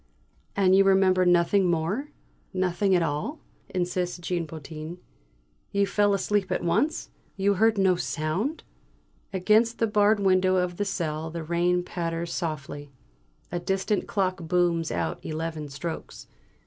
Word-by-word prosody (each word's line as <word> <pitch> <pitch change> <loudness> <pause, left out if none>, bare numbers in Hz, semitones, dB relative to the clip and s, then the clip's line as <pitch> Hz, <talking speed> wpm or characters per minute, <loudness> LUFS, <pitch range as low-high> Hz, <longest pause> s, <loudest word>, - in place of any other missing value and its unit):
"And 190 -1 +4
you 195 - +6
remember 190 -1 +4
nothing 175 +2 +4
more 175 - -1 0.5
nothing 185 +1 +2
at 175 - +3
all?" 160 - -2 0.3
insists 180 0 -1
Jean 175 -1 -2
Potin. 155 +2 -8 0.7
"You 200 0 +2
fell 205 0 +2
asleep 195 -1 0
at 180 - -1
once? 280 - 0 0.3
You 200 +1 +3
heard 220 +3 +3
no 190 -2 +4
sound?" 180 - -2 0.7
Against 215 +5 +3
the 230 - +2
barred 210 -1 +3
window 185 -1 +3
of 180 -1 0
the 205 - 0
cell 160 -5 -2
the 165 0 -5
rain 175 +2 +1
patters 170 -1 -3
softly. 145 -3 -4 0.6
A 175 - -1
distant 190 +3 -1
clock 185 -2 -1
booms 170 -2 +1
out 85 -2 -2
eleven 155 -1 -4
strokes. 160 +4 -6
180 Hz, 135 wpm, -26 LUFS, 165-195 Hz, 0.7 s, you